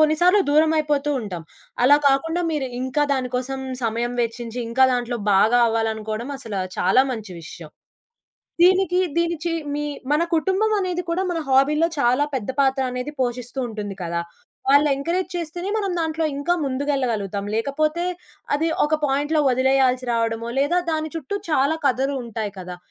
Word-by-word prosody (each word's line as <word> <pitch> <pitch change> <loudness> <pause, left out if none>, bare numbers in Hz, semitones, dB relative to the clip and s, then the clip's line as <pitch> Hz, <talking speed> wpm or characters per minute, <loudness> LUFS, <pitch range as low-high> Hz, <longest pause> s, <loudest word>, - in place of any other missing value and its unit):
కొన్ని 310 0 +4
సార్లు 365 +3 +6
దూరమయిపోతూ 300 -1 +2
ఉంటాం. 180 -7 -6 0.4
అలా 290 +3 +7
కాకుండా 325 +6 +1
మీరు 285 -4 -1
ఇంకా 260 +3 +1
దాని 255 -2 -1
కోసం 265 +1 -3 0.2
సమయం 235 +2 -1
వెచ్చించి 235 +1 -4
ఇంకా 260 +3 +4
దాంట్లో 245 -1 -1 0.2
బాగా 225 +5 +4
అవ్వాలనుకోవడం 220 +2 -2
అసలా 205 -7 -4 0.2
చాలా 190 +8 +4
మంచి 215 -5 -7
విషయం. 160 -1 -10 0.9
దీనికి 370 0 +4 0.2
దీనిచి 340 0 0 0.2
మీ 295 - -2 0.3
మన 305 +3 +3
కుటుంబమనేది 380 0 +1
కూడా 365 +3 0
మన 350 -2 -1
హాబీలో 290 +5 +4
చాలా 255 +3 +3
పెద్ద 260 -4 -2
పాత్ర 270 0 +2
అనేది 250 +4 -4
పోషిస్తూ 245 +1 -3
ఉంటుంది 210 -3 -5
కదా! 170 -1 -2 0.5
వాళ్ళు 285 +2 +5
ఎంకరేజ్ 340 +7 -2
చేస్తేనే 345 +2 -4
మనం 400 -3 -1
దాంట్లో 320 0 -1
ఇంకా 315 +5 +1
ముందుకెళ్ళగలుగుతాం. 255 -8 -1
లేకపోతే, 305 +8 0 0.5
అది 305 +3 +1 0.2
ఒక 295 - -2
పాయింట్‌లో 290 +3 +1
వదిలేయాల్సి 260 0 +2
రావడమో, 230 0 -1
లేదా 290 +6 +2
దాని 315 -1 -2
చుట్టూ 325 +6 -4
చాలా 295 +1 +2
కథలు 270 +2 +1
ఉంటాయి 220 -3 -4
కదా! 180 -1 -7
270 Hz, 145 wpm, -22 LUFS, 235-315 Hz, 0.9 s, అలా